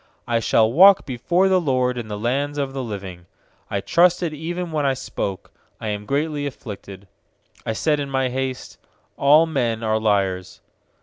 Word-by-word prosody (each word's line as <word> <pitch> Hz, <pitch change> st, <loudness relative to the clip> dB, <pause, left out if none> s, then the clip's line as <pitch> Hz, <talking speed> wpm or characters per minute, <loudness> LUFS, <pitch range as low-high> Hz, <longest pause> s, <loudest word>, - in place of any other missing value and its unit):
9I 115 Hz, -1 st, 0 dB
shall 110 Hz, +1 st, +3 dB
walk 190 Hz, +5 st, +7 dB
before 170 Hz, +9 st, +1 dB
the 185 Hz, -1 st, +3 dB
LORD 130 Hz, -4 st, +1 dB
In 120 Hz, -3 st, -5 dB
the 105 Hz, -1 st, -5 dB
lands 140 Hz, +6 st, -1 dB
of 140 Hz, -2 st, -2 dB
the 135 Hz, -, -3 dB
living. 95 Hz, -6 st, -7 dB, 0.4 s
10I 100 Hz, -1 st, -3 dB
trusted 175 Hz, -, +3 dB
even 170 Hz, +3 st, -4 dB
when 155 Hz, -2 st, -1 dB
I 135 Hz, -1 st, +1 dB
spoke: 100 Hz, -6 st, -5 dB, 0.3 s
'I 110 Hz, -, -5 dB
am 105 Hz, 0 st, -4 dB
greatly 145 Hz, +1 st, -1 dB
afflicted.' 100 Hz, -7 st, -9 dB, 0.6 s
UI 110 Hz, -, -1 dB
said 150 Hz, +5 st, +1 dB
in 140 Hz, -1 st, -3 dB
my 135 Hz, -1 st, 0 dB
haste: 130 Hz, 0 st, -4 dB, 0.4 s
'All 150 Hz, +4 st, +5 dB
men 120 Hz, -8 st, -1 dB
are 110 Hz, 0 st, +1 dB
liars.' 95 Hz, -4 st, 0 dB
130 Hz, 170 wpm, -22 LUFS, 110-150 Hz, 0.6 s, walk